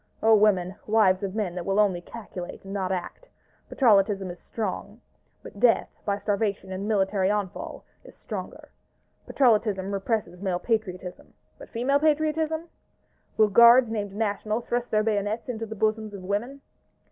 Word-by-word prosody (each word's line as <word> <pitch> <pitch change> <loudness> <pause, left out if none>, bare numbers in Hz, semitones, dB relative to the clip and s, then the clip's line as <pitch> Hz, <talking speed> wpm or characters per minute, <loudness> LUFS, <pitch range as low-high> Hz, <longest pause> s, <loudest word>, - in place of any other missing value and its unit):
O 225 0 +6
women, 200 -4 +3
wives 210 -4 +3
of 195 0 -4
men 205 -5 -1
that 180 -1 -5
will 195 +3 0
only 190 -4 +2
calculate 185 -3 -9
and 195 0 -8
not 190 -2 -2
act! 190 - -5 0.4
Patrollotism 200 -6 +3
is 175 - -11
strong; 210 0 -5 0.4
but 205 - -11
Death, 235 0 +3 0.2
by 200 -1 0
starvation 200 -1 -2
and 190 +2 -4
military 195 -2 +1
onfall, 205 -3 -3 0.2
is - - -15
stronger. - - -8 0.6
Patrollotism 210 -6 +2
represses 195 -3 -2
male 190 -3 0
Patriotism: 185 -3 -4 0.2
but - - -12
female 260 +5 +1
Patriotism? 315 +2 0 0.7
Will 215 -1 +5
Guards 235 +3 +7
named 205 -3 -3
National 215 +1 -1
thrust 240 +1 -2
their 215 0 +2
bayonets 215 0 -1
into 225 -2 -4
the 220 - -7
bosoms 215 0 -1
of 190 - -9
women? 230 +9 -3
210 Hz, 150 wpm, -26 LUFS, 195-225 Hz, 0.7 s, Guards